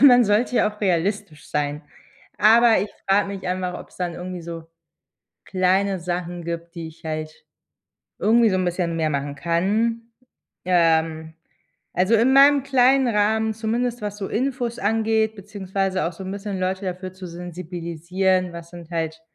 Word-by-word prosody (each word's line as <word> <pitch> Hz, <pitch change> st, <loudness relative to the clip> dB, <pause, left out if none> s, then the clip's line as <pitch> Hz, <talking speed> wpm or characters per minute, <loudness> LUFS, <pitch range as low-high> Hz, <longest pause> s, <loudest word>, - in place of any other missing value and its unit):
man 245 Hz, -4 st, +8 dB
sollte 215 Hz, +5 st, +1 dB
ja -, -, +4 dB
auch 210 Hz, 0 st, -12 dB
realistisch 190 Hz, -3 st, -1 dB
sein. 150 Hz, +1 st, -2 dB, 0.5 s
Aber 230 Hz, +2 st, +6 dB
ich 205 Hz, -, -3 dB, 0.2 s
frage 200 Hz, +1 st, +3 dB
mich 195 Hz, -2 st, -6 dB
einfach, 180 Hz, 0 st, -2 dB
ob's -, -, -13 dB
dann 175 Hz, -2 st, -3 dB
irgendwie 180 Hz, 0 st, -6 dB
so 165 Hz, -1 st, -7 dB, 0.8 s
kleine 190 Hz, +1 st, +1 dB
Sachen 175 Hz, 0 st, -4 dB
gibt, 170 Hz, 0 st, -5 dB
die 165 Hz, -1 st, -5 dB
ich 160 Hz, -, -15 dB
halt 155 Hz, -1 st, -4 dB, 0.8 s
irgendwie 225 Hz, +1 st, +4 dB
so 190 Hz, -, +1 dB
'n 185 Hz, -1 st, 0 dB
bisschen 175 Hz, -1 st, -1 dB
mehr 160 Hz, -1 st, 0 dB
machen 140 Hz, 0 st, -3 dB
kann, 205 Hz, +9 st, 0 dB, 0.6 s
ähm. 160 Hz, -2 st, +2 dB, 0.6 s
Also, 185 Hz, +5 st, +3 dB
in 240 Hz, +4 st, +4 dB
meinem 280 Hz, 0 st, +7 dB
kleinen 265 Hz, -1 st, +4 dB
Rahmen, 220 Hz, 0 st, +1 dB
zumindest 235 Hz, +2 st, -2 dB
was 205 Hz, 0 st, -4 dB
so 200 Hz, -2 st, -4 dB
Infos 245 Hz, 0 st, -2 dB
angeht, 220 Hz, +1 st, +1 dB
beziehungsweise 195 Hz, -1 st, -2 dB
auch 170 Hz, -, -3 dB
so 190 Hz, +3 st, -9 dB
'n 190 Hz, -, -5 dB
bisschen 200 Hz, -1 st, -4 dB
Leute 190 Hz, +1 st, -2 dB
dafür 185 Hz, 0 st, -5 dB
zu 185 Hz, 0 st, -10 dB
sensibilisieren, 175 Hz, +1 st, -2 dB
was 170 Hz, 0 st, -9 dB
sind 175 Hz, -1 st, -11 dB
halt 160 Hz, -1 st, -3 dB
185 Hz, 160 wpm, -23 LUFS, 170-215 Hz, 0.8 s, man